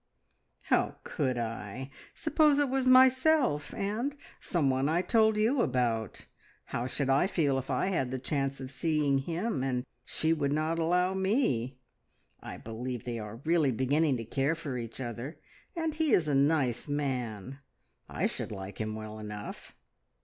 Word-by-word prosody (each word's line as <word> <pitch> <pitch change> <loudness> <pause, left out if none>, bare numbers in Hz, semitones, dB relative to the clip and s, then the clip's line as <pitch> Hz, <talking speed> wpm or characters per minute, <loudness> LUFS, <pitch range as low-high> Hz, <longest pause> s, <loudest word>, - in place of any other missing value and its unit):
"How - - +1
could 130 -1 -1
I? 115 +2 -5 0.2
Suppose 310 -3 +3
it 290 -2 +2
was 265 0 0
myself, 260 - +5
and 225 +8 -2 0.2
someone 135 -4 +1
I 170 +3 +2
told 220 -1 +3
you 235 +5 +3
about. 120 - -1 0.4
How 120 +2 -3
should 140 +1 -2
I 140 +7 +4
feel 145 -8 +1
if 130 - -8
I 135 +8 +1
had 135 -9 0
the 130 - -2
chance 135 0 -1
of 130 0 -7
seeing 150 -2 +1
him, 170 - -2
and 125 -1 -1 0.2
she 160 +5 +1
would 145 -3 0
not 155 +2 0
allow 180 +3 +2
me? 190 - 0 0.6
I - - -8
believe 120 +2 -5
they 120 -2 -4
are 105 +2 -8
really 160 -4 +3
beginning 135 +4 +2
to 115 - -5
care 135 +7 0
for 155 -5 -5
each 115 -1 -5
other, 120 +4 -5 0.4
and 325 -2 -1
he 310 -4 +1
is 160 - +4
a 145 - +1
nice 135 -3 +2
man. 130 -4 -3 0.5
I - - -1
should - - -3
like 100 +1 -6
him 110 0 -3
well 110 0 -7
enough." 105 -1 -8
140 Hz, 160 wpm, -30 LUFS, 125-180 Hz, 0.6 s, myself